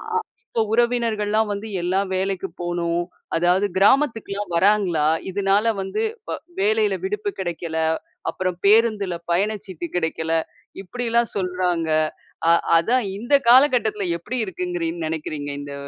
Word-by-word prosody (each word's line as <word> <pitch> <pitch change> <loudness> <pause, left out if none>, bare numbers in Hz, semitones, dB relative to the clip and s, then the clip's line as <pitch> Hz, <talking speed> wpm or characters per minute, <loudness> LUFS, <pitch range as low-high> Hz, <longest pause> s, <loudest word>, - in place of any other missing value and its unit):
அ 450 - +3 0.4
இப்ப 225 - +3
உறவினர்கள்ல்லாம் 225 -3 +1
வந்து, 205 +2 -5 0.2
எல்லாம் 190 +2 0
வேலைக்கு 195 0 -1
போகணும். 175 0 -1 0.3
அதாவது 180 +4 +3
கிராமத்துக்குலாம் 205 -4 +2
வராங்களா? 185 -5 +3 0.2
இதனால 195 +2 +1 0.2
வந்து 190 - -3 0.3
வ - - -1 0.3
வேலையில 425 0 +2
விடுப்பு 420 +1 -2
கெடைக்கல. 170 -3 -3 0.5
அப்பறம் 185 -2 -3
பேருந்துல 210 -3 +4 0.2
பயண 200 +5 +2
சீட்டு 180 -3 -6
கிடைக்கல. 160 -1 -1 0.5
இப்படில்லாம் 235 +3 0
சொல்றாங்க. 180 -3 -1 0.6
அ - - +7 0.3
அதான் 240 +9 +1
இந்த 240 +7 0
காலகட்டத்துல 240 -6 +5
எப்படி 245 +9 -4
இருக்குன்னுங் 175 -2 -3
நெனைக்கிறீங்க, 155 -2 -4
இந்த 145 0 -7
195 Hz, 115 wpm, -22 LUFS, 175-225 Hz, 0.6 s, அ